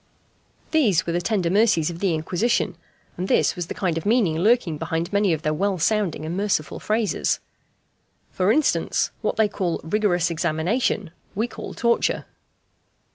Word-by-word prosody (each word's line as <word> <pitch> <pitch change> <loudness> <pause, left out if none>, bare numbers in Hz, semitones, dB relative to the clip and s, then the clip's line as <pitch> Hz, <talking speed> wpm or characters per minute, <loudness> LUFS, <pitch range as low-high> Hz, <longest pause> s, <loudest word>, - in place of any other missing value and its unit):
These 235 - +3
were 170 - -2
the 175 - 0
tender 185 -4 0
mercies 200 -6 +3
of 170 - -8
the 185 -4 +1
Inquisition; 180 +9 0 0.4
and 180 +2 -2
this - - +2
was 175 -3 -4
the - - -6
kind 170 -4 -1
of - - -12
meaning 205 -9 +2
lurking 195 -6 +2
behind 165 +3 -3
many 200 -2 +3
of 160 -1 -1
their 155 - +1
well 195 +4 0
sounding 180 -3 0
and 165 +2 -3
merciful 195 -7 -1
phrases. 215 -1 0 0.9
For 185 +2 +2
instance, 305 +4 +1
what - - -1
they 220 -1 +3
call 185 -4 -2
"rigorous 180 -1 +1
examination," 170 +4 0 0.2
we 220 +4 0
call - - -8
"torture." 235 0 +1
185 Hz, 160 wpm, -23 LUFS, 165-215 Hz, 0.9 s, These